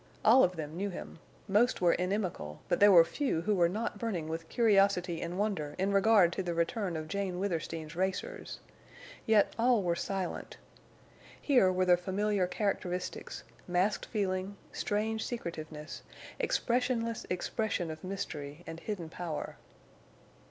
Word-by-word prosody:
All 240 +5 +8
of 180 0 +2
them 155 -1 -5
knew 200 +3 -2
him, 175 - -8 0.3
most 215 +5 +3
were 175 -2 +4
inimical, 180 - -2
but 175 - +1
there 205 0 +8
were 170 -3 +8
few 265 - -1
who 210 +5 +1
were 175 -3 +3
not 215 +6 -3
burning 195 -10 -2
with 165 0 -5
curiosity 195 -6 +3
and 170 +2 -4
wonder 190 -8 -1
in 195 +2 +1
regard 195 -3 +5
to 190 - -2
the 175 -2 -3
return 175 +1 -1
of 155 0 -5
Jane 190 +1 -2
Withersteen's 165 -4 -3
racers. 190 - -3 0.7
Yet 215 -2 +4
all 235 -3 +4
were 170 -1 +1
silent. 190 0 -4 0.8
Here 250 -10 +4
were 185 0 +1
the 180 -1 +5
familiar 195 +1 0
characteristics—masked 185 0 -2
feeling—strange 205 +2 -2
secretiveness—expressionless 230 +7 -3
expression 180 -1 -1
of 155 - -9
mystery 170 -5 -5
and 165 - -7
hidden 185 -3 -4
power. 165 -2 -5
185 Hz, 135 wpm, -31 LUFS, 170-210 Hz, 0.8 s, All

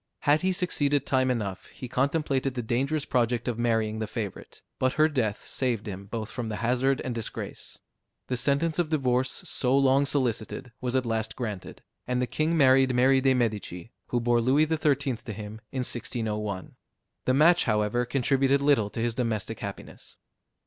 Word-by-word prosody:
Had 150 +2 +3
he 190 - +2
succeeded 145 -7 0
time 130 -1 +2
enough, 105 -6 -3
he 130 - -9
contemplated 135 0 0
the 120 - -2
dangerous 135 +6 0
project 120 -1 0
of 120 -2 -2
marrying 110 -2 +1
the 110 - -2
favorite; 110 -3 -6 0.2
but 130 0 +2
her 155 +1 +4
death 120 -9 -2
saved 120 -5 -1
him 100 -1 -7
both 110 0 -5
from 120 -3 -4
the 105 - -3
hazard 125 +4 +1
and 130 - -2
disgrace. 115 -2 -6 0.5
The 125 - -2
sentence 145 +6 +1
of 170 -3 +1
divorce, 130 -4 +1
so 130 +1 0
long 135 +1 +4
solicited, 125 -2 -2
was 125 0 -2
at 130 -1 +1
last 110 -1 -2
granted, 110 -7 -6 0.2
and 125 0 0
the 125 - +1
king 155 +6 0
married 130 -2 +5
Mary 130 +2 +4
de 135 0 +3
Medici, 110 -4 -2 0.2
who 120 - 0
bore 120 0 +2
Louis 135 +6 +4
XIII. 145 -5 +1
to 110 -1 -8
him 105 +1 -8
in 130 - -2
1601. 105 -6 -3 0.5
The 130 - +3
match, 170 +5 +5
however, 105 +2 +1
contributed 135 +2 +2
little 140 -7 +3
to 115 - -6
his 120 0 0
domestic 115 -4 -2
happiness. - - -9
125 Hz, 175 wpm, -27 LUFS, 115-135 Hz, 0.5 s, married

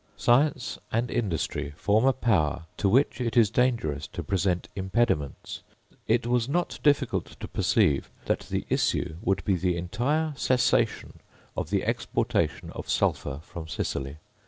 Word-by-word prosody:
Science 135 +1 +2
and 115 +2 0
industry 80 -8 -2
form 110 +4 +2
a 135 - +6
power 90 - +1
to 100 - +1
which 130 +4 +3
it 120 0 -1
is 110 -3 +5
dangerous 115 - 0
to 85 - -6
present 90 +1 0
impediments. 95 -7 -1 0.5
It 115 +1 +2
was 120 0 +1
not 175 +4 -1
difficult 145 -4 +1
to - - -6
perceive 70 -2 +2 0.2
that - - -1
the - - -2
issue 80 - 0
would 95 -3 0
be 95 - +3
the 90 0 0
entire 145 - -1
cessation 130 -2 +1 0.4
of - - -3
the - - 0
exportation - - -1
of - - -8
sulphur 70 0 0
from 85 -2 -8
Sicily. 70 -3 -3
105 Hz, 145 wpm, -27 LUFS, 85-125 Hz, 0.5 s, a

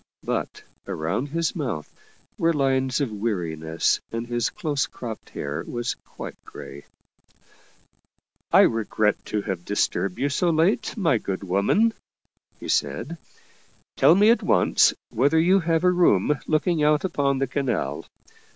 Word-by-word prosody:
But - - -3 0.2
around 85 - -2
his 165 +4 -1
mouth 120 - -4 0.4
were 165 0 +1
lines 135 -2 +1
of 135 -5 -1
weariness 85 -7 -1
and 115 +1 -3
his 120 -1 -1
close 150 -8 -2
cropped 115 -3 -8
hair 70 +1 -4
was 120 -1 -2
quite - - -11
gray. 70 +1 -11 0.8
" - - -40
I - - +7
regret 110 -1 +1
to 105 -1 -2
have 95 -4 -4
disturbed 100 -1 -1
you 140 - 0
so 170 +5 +1
late, 175 +9 +1
my 165 - +2
good 95 -1 -4
woman/* 100 - +2 0.7
he - - -8
said. - - -1 0.4
" - - -35
Tell - - +6
me 210 +4 +6
at 235 - +2
once - - +3 0.2
whether 140 +7 +2
you 185 +4 +4
have 165 -1 0
a 180 - +5
room 150 - +3
look 155 -1 +1
ing 170 -4 +1
out 150 +3 +3
upon 140 -6 0
the 135 - +1
canal. 135 0 -2
135 Hz, 150 wpm, -24 LUFS, 105-165 Hz, 0.8 s, I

